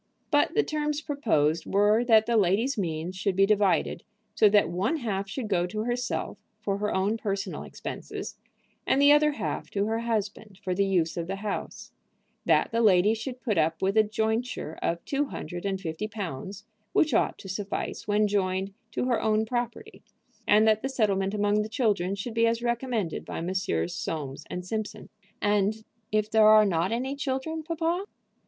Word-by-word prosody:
But 290 +2 +3
the 440 - +4
terms 300 -1 -1
proposed 210 - 0
were 210 +3 +3
that 220 -2 +5
the 235 - 0
lady's 215 +7 +2
means 170 -3 -3
should 190 0 -1
be 195 +1 +5
divided 205 -2 +1 0.3
so 215 - +5
that 205 0 +4
one 190 - 0
half 200 -7 -3
should 235 +2 -4
go 180 -4 +1
to 215 +4 -4
herself 245 +2 -2 0.2
for 200 -1 -2
her 210 0 -1
own 200 +4 +1
personal 200 -3 -3
expenses, - - -7 0.5
and 270 - +3
the 285 +1 +7
other 300 0 +5
half - - -4
to 200 0 -1
her 225 +1 -1
husband 215 -3 -3
for 185 -1 -1
the 200 +2 +1
use 175 -4 +1
of 170 -1 -3
the 195 - -2
house; 200 +1 -5 0.5
that - - +3
the 230 0 +1
lady 205 -1 +5
should 245 +2 -6
put 210 -7 +1
up 160 +2 0
with 195 +2 +1
a 220 - +7
jointure 220 -4 -2
of 170 0 -2
two 285 +1 0
hundred 175 -8 -6
and 190 -1 -2
fifty 170 +3 -4
pounds, 200 -1 -6 0.3
which 310 -4 +3
ought - - +2
to - - -11
suffice 200 +3 -4
when 210 0 +3
joined 190 -1 -1 0.2
to 250 - -2
her 240 -3 +1
own 220 0 +2
property, 245 - -4 0.5
and 215 +1 +5
that 215 0 +3
the 270 - -2
settlement 200 -5 0
among 205 0 +2
the 210 - -4
children 205 -6 0
should 210 +4 -5
be 230 0 +3
as 230 +1 0
recommended 235 -7 -1
by - - -6
Messrs. 165 - -1
Soames 140 -4 -5
& - - -3
Simpson. 215 +2 -5 0.3
"And 210 +1 +1 0.3
if 215 0 +1
there 220 -1 +6
are 215 0 +7
not 180 0 +1
any 260 +4 -2
children, 280 +3 -3
papa?" 330 +4 -1
210 Hz, 185 wpm, -27 LUFS, 190-235 Hz, 0.5 s, the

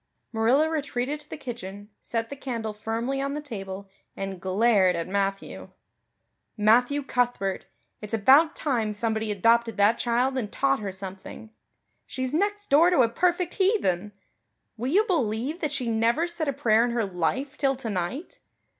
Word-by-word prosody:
Marilla 240 +8 +3
retreated 290 -2 -2
to 300 - -15
the - - -6
kitchen, 205 -6 -8
set 230 +1 -3
the - - -4
candle 235 -6 -4
firmly 230 +5 -3
on 275 0 -2
the - - -2
table, 200 -8 -7 0.3
and 195 -2 -5
glared 190 -1 +3
at 170 0 -3
Matthew. 195 0 -3 0.9
"Matthew 245 +7 +3
Cuthbert, 245 -7 -1 0.3
it's 210 +1 -3
about 275 +9 +5
time 230 -7 -1
somebody 220 0 -1
adopted 230 +2 +2
that 205 +3 +4
child 250 +3 +1
and 210 -4 -5
taught 275 0 +1
her 200 -2 -4
something. 190 +3 -9 0.6
She's 260 0 -4
next 410 +3 -1
door 320 +5 +6
to 355 -7 +4
a 230 - +3
perfect 355 +6 0
heathen. 210 - +1 0.6
Will 240 +2 -4
you 405 +6 +5
believe 280 - -1
that 305 -3 -1
she 255 -4 -3
never 230 +8 +2
said 340 -2 -4
a 280 - 0
prayer 230 -5 +3
in 245 - 0
her 235 -2 0
life 195 - -2
till 275 -2 +1
tonight? 250 - -4
235 Hz, 160 wpm, -26 LUFS, 210-280 Hz, 0.9 s, door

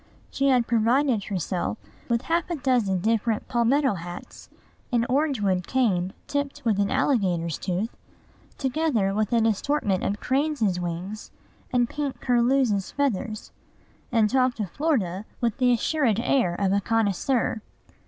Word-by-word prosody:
She 275 - +1
had 250 -3 +4
provided 235 0 +2
herself 185 +2 -2 0.3
with 235 +1 +1
half 335 +1 0
a 345 - -1
dozen 245 - +1
different 225 +1 0
palmetto 260 +2 +2
hats, 175 -1 -9 0.4
an 235 -1 +2
orange 275 -2 +1
wood 185 -3 0
cane 190 -8 +1
tipped 285 -3 -3
with 215 -3 +2
an 200 - +2
alligator's 185 - +1
tooth, 190 +5 -2 0.6
together 265 -8 0
with 215 0 0
an 230 -2 +3
assortment 215 -3 0
of 205 +1 -1
cranes' 265 - 0
wings 180 +5 -5 0.4
and 245 -2 +2
pink 285 0 -4
curlews' 240 -4 +2
feathers, 230 -6 -2 0.6
and 225 -3 +4
talked 255 0 +1
of 200 -5 -3
Florida 215 - 0 0.2
with 235 -3 0
the 250 -1 +4
assured 240 -2 +1
air 235 -8 +1
of 195 +1 +1
a 200 - +2
connoisseur. 225 +2 0
230 Hz, 140 wpm, -25 LUFS, 200-265 Hz, 0.6 s, had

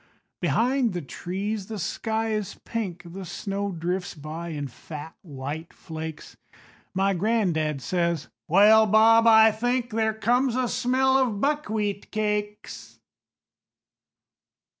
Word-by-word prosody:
Behind 230 - +1
the 175 - -3
trees 190 - -4
the 220 - -5
sky 220 +4 -2
is 210 -3 -3
pink, 195 -5 -4
The 185 +3 -8
snow 200 +3 -4
drifts 180 +2 -3
by 155 +3 -7
in 145 -4 -4
fat 150 +4 -9
white 150 +1 -7
flakes, 160 -1 -8 0.6
My 195 +1 +2
gran'dad 175 -8 0
says: 170 -4 -1 0.2
"Well, 215 +5 +6
Bob, 225 +2 +6
I 220 0 +8
think 245 +3 -1
There 220 0 0
comes 245 +3 +1
a 255 -1 +1
smell 260 +2 +2
of 235 -6 0
buckwheat 215 -8 -1
cakes." 210 -1 -3
205 Hz, 120 wpm, -25 LUFS, 170-225 Hz, 0.6 s, I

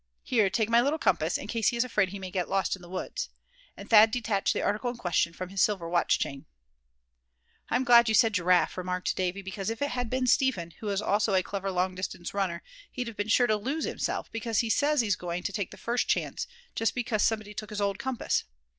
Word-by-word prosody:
Here, 220 -6 +2
take 220 +2 0
my 230 +1 +5
little 285 +5 +1
compass, 325 - +1
in - - -8
case 225 -3 -1
he 240 - +2
is 235 - +3
afraid 210 -6 +1
he 200 - -6
may 190 -1 -7
get 180 -2 -2
lost 195 0 +1
in 190 - -16
the 175 - -13
woods," - - -4 0.5
and - - -9
Thad 220 0 +7
detached 220 -4 0
the - - -1
article 210 +4 0
in 240 - -6
question 175 -5 +1
from 180 +2 -7
his 195 -1 -1
silver 190 -6 +1
watch 175 0 +2
chain. 140 +3 -5 1.2
"I'm 250 +2 +1
glad 235 -2 +6
you 220 - +3
said 225 0 +4
Giraffe," 180 -1 +2
remarked 180 0 -2
Davy; 185 +1 -2
"because 195 +1 -4
if 225 - -4
it 285 0 -1
had 245 -2 -2
been 255 +1 0
Step 265 0 +3
hen, 170 -1 -7
who 215 - -4
is 200 +1 -1
also 205 0 +2
a 185 - +3
clever 195 0 -4
long 185 0 0
distance 185 -1 -5
runner, 185 -4 -2 0.3
he'd 245 -2 -4
have 225 - -11
been 205 0 -2
sure 245 +3 +4
to 215 -2 +2
lose 275 +9 -2
himself, - - -3
because 225 -1 0
he 230 -2 -1
says 295 +1 +3
he's 205 -4 +1
going 175 0 -4
to 205 - -3
take 200 -3 -2
the - - -12
first 240 +1 -1
chance, - - -1 0.3
just 225 - 0
because 230 -4 -1
somebody 215 -2 0
took 215 0 -6
his 210 - -5
old 200 -1 -1
compass. 255 0 -1
210 Hz, 240 wpm, -28 LUFS, 185-235 Hz, 1.2 s, Thad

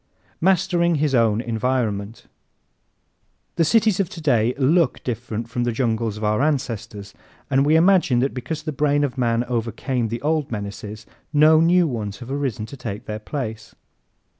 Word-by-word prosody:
Mastering 175 -1 +2
His 150 -1 0
Own 115 -3 +3
Environment 115 -3 -2 1.3
¶ - - -48
The 165 - +3
cities 220 +3 +3
of 190 -3 0
today 125 -9 +1
look 145 +2 +2
different 115 -2 -4
from 120 +1 -2
the 120 - 0
jungles 115 -2 -1
of 110 - -7
our 105 +3 +1
ancestors 115 -8 -2 0.4
and 135 +1 +3
we 155 - +4
imagine 170 -6 +4
that 135 - 0
because 150 +5 -5
the 155 - -3
brain 145 0 +1
of 140 -3 -2
man 120 -2 +1
overcame 120 +1 -2
the 115 +3 -5
old 155 -3 0
menaces 105 0 -6 0.3
no 155 +1 +6
new 175 +1 +4
ones 105 -7 -4
have 125 +1 -9
arisen 135 -6 -2
to 115 - -10
take 115 -5 -6
their 105 0 -5
place. 110 -2 -6
125 Hz, 165 wpm, -22 LUFS, 110-150 Hz, 1.3 s, no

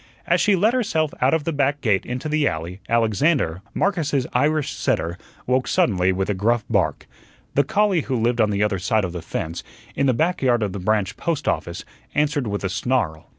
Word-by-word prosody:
As - - +2
she 205 -2 +4
let 210 +6 +3
herself 160 - 0
out 130 +5 +4
of 160 - -1
the 165 - -2
back 145 0 +1
gate 105 -8 +1
into 125 +5 -4
the 155 -1 +1
alley, 85 +4 -4
Alexander, 115 - +1
Marcus's 155 -9 0
Irish 150 +3 +1
setter, 80 +2 -1 0.3
woke 130 +1 +1
suddenly 95 -4 +2
with 95 +1 -1
a 105 - 0
gruff 110 +4 +1
bark. - - 0 0.5
The 140 - +3
collie 200 -3 +2
who 135 - -3
lived 120 0 +1
on 110 - +3
the 100 0 +1
other 105 -2 0
side 105 +2 +1
of 90 - -4
the 90 - -5
fence, 80 +2 -4 0.3
in 140 - +1
the 130 - +3
back 170 +8 0
yard 120 -4 +2
of 100 -3 -2
the 100 - -4
branch 105 +1 0
post 160 -4 -2
office, 85 0 -2 0.3
answered 150 -3 +1
with 100 -1 -3
a 95 - 0
snarl. 90 -6 -1
120 Hz, 205 wpm, -22 LUFS, 95-150 Hz, 0.5 s, she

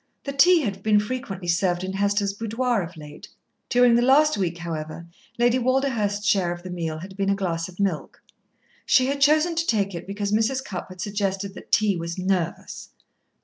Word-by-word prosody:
The 275 - -4
tea 345 +5 +5
had 200 -7 -3
been 210 0 +3
frequently 210 -5 -5
served 175 +1 +1
in 190 0 -4
Hester's 200 0 0
boudoir 230 +2 -1
of 170 -1 -8
late. 150 -1 -11 0.4
During 245 -1 +5
the 235 - +4
last 290 +5 +4
week, 175 -4 -2
however, 165 -1 -6 0.3
Lady 240 +1 +3
Walderhurst's 235 -6 0
share 190 -4 +2
of 175 0 -7
the 185 - -7
meal 165 -3 -3
had 190 +4 -9
been 195 0 -1
a 200 - +3
glass 170 -3 -2
of 180 - -15
milk. 195 -6 -2 0.6
She 255 - +4
had 280 +1 -2
chosen 310 +4 +4
to 330 0 -1
take 200 -4 +1
it 170 +1 -7
because 200 +1 -3
Mrs. 230 +5 +1
Cupp 190 -5 -6
had 185 -1 -9
suggested 200 -1 -2
that - - -13
tea 205 -3 +3
was 170 +1 -5
"nervous." 185 -2 -2
200 Hz, 190 wpm, -24 LUFS, 180-240 Hz, 0.6 s, tea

